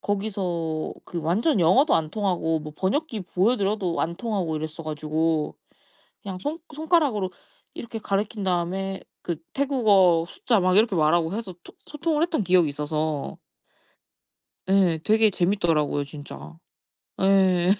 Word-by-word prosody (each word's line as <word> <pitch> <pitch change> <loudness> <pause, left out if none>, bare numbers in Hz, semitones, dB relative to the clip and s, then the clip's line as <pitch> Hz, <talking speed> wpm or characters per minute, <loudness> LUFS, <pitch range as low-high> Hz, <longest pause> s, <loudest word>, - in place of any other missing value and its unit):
거기서 180 -6 -2
그 170 - -5
완전 200 - +1
영어도 255 - +4
안 155 -1 0
통하고 175 -6 0
뭐 150 0 -8
번역기 225 +3 -1
보여드려도 195 -2 0
안 170 - -1
통하고 190 -9 -2
이랬어 155 +1 -5
가지고 155 +1 -1 0.7
그냥 190 -2 -6
손 300 - -4
손가락으로 295 - +1 0.4
이렇게 225 -1 -7
가리킨 205 +1 -2
다음에 190 +2 -1 0.2
그 170 - -3 0.2
태국어 205 - +3
숫자 225 +4 0
막 185 +1 +3
이렇게 215 -3 +4
말하고 160 +2 +2
해서 210 -4 -5
토 - - -14
소통을 305 +1 -1
했던 320 - 0
기억이 180 -4 +3
있어서 150 0 -3 1.3
예. 190 -4 +3
되게 220 0 +4
재미있더라고요 170 -6 +1
진짜. 80 - -10 0.6
예. 190 -2 +4
185 Hz, 300 characters per minute, -25 LUFS, 160-215 Hz, 1.3 s, 영어도